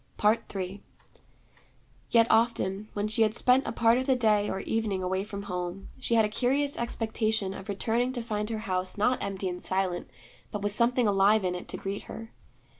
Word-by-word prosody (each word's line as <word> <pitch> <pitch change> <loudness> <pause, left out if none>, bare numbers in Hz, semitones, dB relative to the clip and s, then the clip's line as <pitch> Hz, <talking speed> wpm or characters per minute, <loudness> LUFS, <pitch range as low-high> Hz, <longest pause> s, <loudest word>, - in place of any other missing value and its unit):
III 195 0 -5 1.3
Yet 230 -1 +5
often, 215 -3 +1
when 205 0 -1
she 225 +2 0
had 215 0 +3
spent 255 +3 +3
a - - -1
part 230 +1 +3
of 260 - -3
the 265 - +4
day 215 -4 +2
or 190 - -2
evening 215 -4 -1
away 190 +1 -1
from 200 -1 -6
home, 180 0 -5
she 235 - 0
had 225 -1 +5
a - - +1
curious 270 +6 +1
expectation 220 -3 -1
of 195 +1 -9
returning 230 +5 0
to 240 -2 -2
find 210 -2 -2
her 225 - -2
house 185 +1 0
not 245 +5 +2
empty 195 -1 -3
and 180 0 -4
silent, 185 -5 -1 0.4
but 205 -1 -5
with 205 0 0
something 240 +1 +2
alive 200 +1 +4
in 180 -1 0
it 180 - -6
to - - -3
greet 195 +1 -4
her. 225 0 -8
210 Hz, 190 wpm, -28 LUFS, 195-230 Hz, 1.3 s, Yet